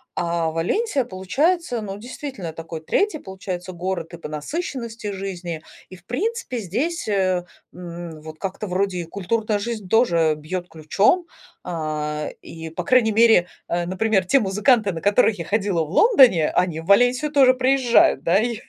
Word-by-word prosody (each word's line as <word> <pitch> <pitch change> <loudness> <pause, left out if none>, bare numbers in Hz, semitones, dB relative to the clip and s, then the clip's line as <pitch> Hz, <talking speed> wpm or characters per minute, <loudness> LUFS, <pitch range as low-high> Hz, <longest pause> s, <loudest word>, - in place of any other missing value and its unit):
А 170 -1 -1
Валенсия, 270 - 0
получается, 245 - 0
ну, 195 -1 -6
действительно, 240 - -7
такой 165 0 -8
3, 395 - 0
получается, 185 -3 -6
город 175 -1 -4
и - - -7
по 165 - -8
насыщенности 230 - -5
жизни. 180 -4 -5 0.3
И, 185 - -10
в 175 -1 -19
принципе, 405 - -3
здесь, 240 - -2
э, 185 -3 +1 0.3
м, 170 -2 -8
вот, 155 0 -10
как-то 195 +3 -5
вроде 185 0 -1
и 175 - -2
культурная 210 +5 -1
жизнь 215 -3 -5
тоже 170 -9 +3
бьёт 175 +4 -5
ключом, 195 - +1 0.4
а, 150 -2 -3
и, 165 0 -9
по 180 - -4
крайней 225 +1 +3
мере, 220 -5 +5 0.2
э, 175 0 -1
например, 190 +2 +1
те 275 +9 +4
музыканты, 210 +2 +2
на 165 - -5
которых 205 +1 +3
я 170 - -4
ходила 200 -3 0
в - - -11
Лондоне, 250 - +5
они 170 -3 0
в 165 - -14
Валенсию 245 +8 +4
тоже 270 -3 +6
приезжают, 255 - +3
да? 175 +3 +3
И 230 0 -1
195 Hz, 160 wpm, -22 LUFS, 170-240 Hz, 0.4 s, тоже